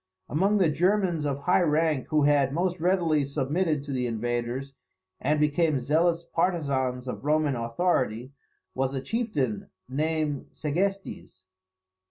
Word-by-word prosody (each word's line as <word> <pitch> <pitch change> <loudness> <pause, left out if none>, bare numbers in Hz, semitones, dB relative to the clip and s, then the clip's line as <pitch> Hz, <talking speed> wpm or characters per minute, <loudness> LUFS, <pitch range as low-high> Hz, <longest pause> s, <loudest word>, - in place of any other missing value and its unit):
Among 195 +8 +2
the 185 -4 +4
Germans 180 -2 +1
of 140 0 -3
high 180 +5 +3
rank 155 -3 +1
who 155 -1 +2
had 140 -2 +3
most 180 +1 0
readily 170 -4 +2
submitted 150 +3 -1
to 145 - -7
the 125 -2 -1
invaders, 120 +4 -3 0.5
and 150 +3 +1
become 150 0 +2
zealous 165 +5 +1
partisans 140 -8 -1
of 125 - -5
Roman 150 -1 +2
authority, 120 -1 -1 0.4
was 135 +1 -1
a 135 - -2
chieftain 150 - -2 0.2
named 150 +1 -1
Segestes. 180 - -3
150 Hz, 130 wpm, -27 LUFS, 135-170 Hz, 0.5 s, the